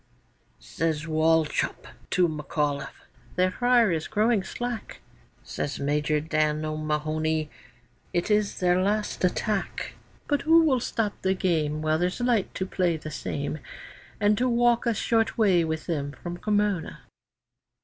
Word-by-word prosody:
Says 150 - -2
Wauchop 160 0 +1 0.2
to 180 -1 +3
McAulliffe, 150 -2 -3 0.3
'Their 185 +1 +2
fire 245 -1 +3
is 160 -2 -1
growing 220 -1 +2
slack.' 235 - -5 0.4
Says 145 - -4
Major 150 +2 +1
Dan 155 0 0
O'Mahony, 155 0 -1 0.6
'It 175 +5 -1
is 210 -1 +1
their 180 0 +3
last 205 +1 -1
attack; 195 +2 -1 0.3
But 290 -1 +1
who 330 0 +6
will 270 -5 +3
stop 225 -3 -1
the 190 0 +1
game 155 -5 0
While 155 0 +1
there's 180 +4 -1
light 245 -5 +1
to 185 - -2
play 180 -3 0
the 155 0 -8
same, 145 +1 -4 0.6
And 210 0 +4
to 255 +1 +2
walk 240 0 +3
a 230 - +2
short 225 +1 +1
way 190 -6 +4
with 160 -1 -3
them 145 -4 -2
from 175 +6 -6
Cremona? 205 -3 0
175 Hz, 140 wpm, -26 LUFS, 155-215 Hz, 0.6 s, who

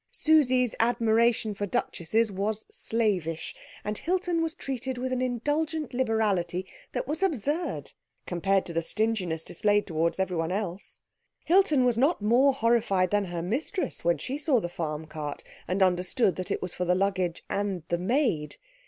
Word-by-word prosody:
Susie's 255 -6 +3
admiration 230 -1 +2
for 205 0 -3
duchesses 215 +5 0
was 205 +3 -1
slavish, 190 -8 -1 0.3
and 210 0 -3
Hilton 355 -1 0
was 325 0 -1
treated 260 -4 -4
with 255 +1 -2
an 255 - -1
indulgent 290 +4 -1
liberality 210 -7 0 0.3
that - - -3
was 310 +4 -2
absurd 320 - -1 0.3
compared 195 +2 +1
to 170 - -6
the 165 - +1
stinginess 185 -4 0
displayed 205 +5 +1
towards 165 +1 0
everyone 180 -3 -1
else. 195 0 -4 0.4
Hilton 315 -7 +4
was 240 -2 +2
not 290 +7 +3
more 240 +6 +4
horrified 230 -7 +2
than 205 -1 +2
her 175 -2 -4
mistress 280 - -2
when 170 -1 +2
she 260 - -4
saw 285 -5 +3
the 175 - -3
farm 160 -2 -4
cart, 150 -2 -6 0.2
and 190 +2 +2
understood 185 +4 +2
that 185 - -4
it - - -2
was 180 - -5
for 180 - -2
the 180 0 +2
luggage 185 -3 0
and 200 -4 -2
the 170 - 0
maid. 190 - 0
215 Hz, 160 wpm, -27 LUFS, 180-255 Hz, 0.4 s, Hilton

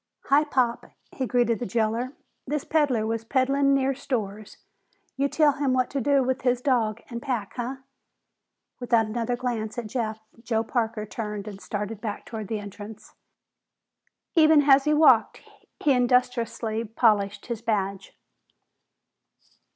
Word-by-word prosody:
"Hi, 285 +2 +5
Pop," 250 -5 0 0.2
he 260 - -3
greeted 240 -2 +1
the 245 - -3
jailer. 230 +5 -1 0.3
"This 295 +1 -2
peddler 280 -8 +1
was 225 0 -2
peddlin' 275 +3 +2
near 270 0 +1
stores. 215 -6 -4 0.6
You 275 +1 0
tell 300 -1 +4
him 280 -2 0
what 255 -1 +1
to 275 - -1
do 280 +1 +3
with 260 +1 -1
his 250 -1 +1
dog 235 -4 0
and 235 0 -5
pack, 235 -7 -3
huh?" 245 +2 -3 1.0
Without 235 -2 +2
another 230 +2 -2
glance 235 -3 -3
at 240 - -3
Jeff, 220 -1 -3 0.2
Joe 225 -2 0
Parker 225 -2 -2
turned 210 -1 -5
and 200 -2 -8
started 210 0 -5
back 210 -3 -5
toward 220 -3 -6
the 220 - -2
entrance. 205 +1 -10 1.2
Even 310 -3 +6
as 275 -1 +5
he 300 - +3
walked, 270 -7 +4 0.4
he 295 - +4
industriously 245 -3 +1
polished 210 -3 +1
his 235 -3 -5
badge. 200 -3 -2
235 Hz, 145 wpm, -25 LUFS, 220-265 Hz, 1.2 s, Even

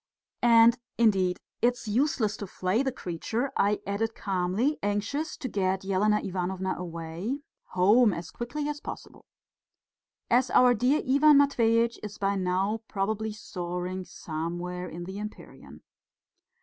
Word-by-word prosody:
"And, 235 0 +6 0.2
indeed, 195 -6 +3 0.2
it's 245 -1 +1
useless 220 -2 +1
to 205 - -6
flay 185 +5 0
the 270 -1 0
creature," 230 +5 -3
I 205 +1 +2
added 220 +3 -2
calmly, 195 +9 0
anxious 205 +10 -2
to 260 - -4
get 190 -3 -1
Elena 210 +2 +2
Ivanovna 190 0 -2
away 170 - -5 0.3
home 210 +6 +5
as 170 -2 -6
quickly 285 - -4
as 295 0 -4
possible, - - -9 1.1
"as 250 +2 +4
our 250 0 +6
dear 250 +6 +2
Ivan 285 +2 +6
Matveitch 235 -4 +3
is 210 0 -7
by 200 0 0
now 190 +3 0
probably 215 +2 -2
soaring 180 -2 -5
somewhere 175 +2 -5
in 175 +2 -7
the 190 +3 -6
empyrean." 210 0 -10
210 Hz, 130 wpm, -28 LUFS, 185-240 Hz, 1.1 s, And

